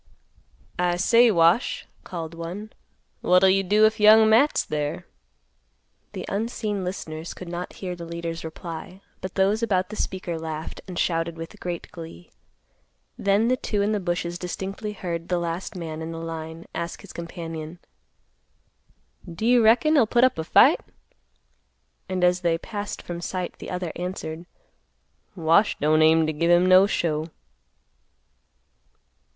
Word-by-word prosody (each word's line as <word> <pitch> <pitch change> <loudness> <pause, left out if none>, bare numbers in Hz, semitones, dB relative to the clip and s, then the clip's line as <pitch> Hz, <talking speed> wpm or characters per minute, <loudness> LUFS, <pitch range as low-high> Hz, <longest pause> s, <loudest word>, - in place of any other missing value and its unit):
"I 175 -1 +2
say, 230 +6 +5
Wash," 170 +3 +3 0.2
called 165 -2 -6
one, 175 +6 -7 0.5
"What'll 180 +1 +5
you 195 +1 +3
do 210 +3 +4
if 220 +1 +1
Young 215 +1 +7
Matt's 235 +7 +4
there?" 150 -1 -3 1.1
The - - -5
unseen 210 -1 -2
listeners 165 -3 -5
could 180 - -9
not 175 +1 -5
hear 180 -2 -5
the 170 -1 -8
leader's 170 0 -5
reply; 170 +3 -8 0.2
but 185 - -6
those 200 +3 +2
about 185 -5 +1
the 215 - -7
speaker 180 -5 -3
laughed 160 -1 -6
and 180 -2 -7
shouted 165 -1 0
with 165 0 -9
great 175 -1 -5
glee. 160 - -11 0.8
Then 200 +3 +2
the 255 - +3
two 210 -4 -1
in 210 - +1
the 210 - 0
bushes 175 -1 -2
distinctly 195 +4 -5
heard 170 -4 -5
the 180 - +1
last 170 +2 -4
man 160 -3 -5
in 160 +1 -5
the 165 - -6
line 165 0 -6
ask 170 0 -5
his - - -12
companion, 165 -1 -7 1.5
"Do 175 +7 -4
you 240 0 +5
reckon 235 +8 +5
he'll 270 -8 +5
put 240 +3 +3
up 255 -10 +3
a - - -1
fight?" 160 - +5 1.3
and 185 -1 -1
as 180 0 +3
they 170 -2 +1
passed 205 +3 -6
from 175 -1 -6
sight, 180 0 -4
the - - -8
other 180 -2 -3
answered, 175 -2 -5 0.9
"Wash 165 +6 +3
don't 155 +1 +3
aim 160 0 +5
t' 155 - -1
give 165 +3 0
him 175 +1 +5
no 185 +1 +7
show." 160 -4 -1
180 Hz, 150 wpm, -24 LUFS, 165-200 Hz, 1.5 s, Young